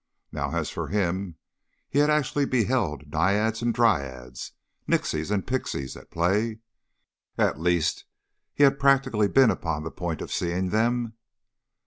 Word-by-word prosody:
Now - - -2
as - - -1
for - - -4
him, 95 -3 -1 0.5
he 140 - 0
had 150 +1 +4
actually 145 -1 +1
beheld 105 - 0
naiads 105 +7 +1
and 120 0 +1
dryads, 70 - -1 0.3
nixies 80 +3 0
and 100 -2 0
pixies, 95 - -3
at - - -13
play 105 +7 0 0.8
at 75 - +1
least 85 -2 +1 0.5
he 145 - +2
had 140 0 +5
practically 135 -6 +3
been 130 +1 +5
upon 80 -5 -3
the 80 - -5
point 80 +1 -4
of - - -8
seeing 90 +1 -1
them. 115 +1 +1
100 Hz, 140 wpm, -26 LUFS, 85-120 Hz, 0.8 s, had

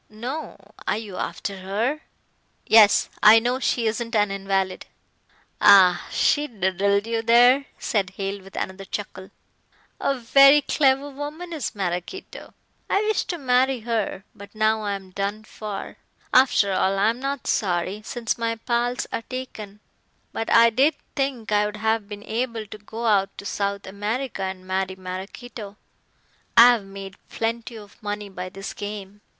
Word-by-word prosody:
"No. 250 +9 -6 0.3
Are - - +1
you 210 -4 -7
after 195 -1 -4
her?" 220 +11 -2 0.6
"Yes, 215 -2 +6
I 215 +2 +9
know 245 +3 +1
she 240 -3 0
isn't 230 +1 -2
an 205 -1 +2
invalid." 195 -1 -2 0.7
"Ah, 185 -3 +6
she 295 0 +2
diddled 200 -2 0
you 230 0 -1
there," 245 +4 +5
said 200 -4 -1
Hale 195 0 -3
with 195 0 -15
another 190 +1 -4
chuckle, 190 -1 -6 0.7
"a 275 - 0
very 275 +4 +6
clever 275 0 +1
woman 300 +5 -7
is 290 -7 -4
Maraquito. 185 - -5 0.3
I 400 - +2
wished 430 0 0
to 345 - -2
marry 260 -2 +2
her, 220 -4 -2
but 200 +2 -13
now 215 0 +1
I'm 195 -2 -4
done 200 +3 -3
for. 215 -2 -7 0.4
After 250 -6 +4
all, 190 +1 +1
I'm 225 +5 +2
not 275 0 -3
sorry, 185 +1 -1
since 235 +1 -3
my 230 0 -1
pals 240 +2 -1
are - - -2
taken. 220 -5 -8 0.5
But 225 - -3
I 230 0 +6
did 275 +6 +3 0.2
think 270 -6 -2
I'd 210 0 +1
have 220 -1 0
been 205 -1 -8
able 230 0 -3
to 215 - -10
go 210 -2 0
to 200 - -9
South 200 0 -2
America 210 +4 -4
and 190 -1 -4
marry 190 0 -2
Maraquito. 195 +3 -8 0.8
I've 235 -3 +7
made 195 -1 -9
plenty 230 +1 -3
of 205 +1 -14
money 205 -1 -4
by 185 -1 -6
this 195 +2 -7
game. 205 -1 -7
215 Hz, 145 wpm, -24 LUFS, 195-245 Hz, 0.8 s, I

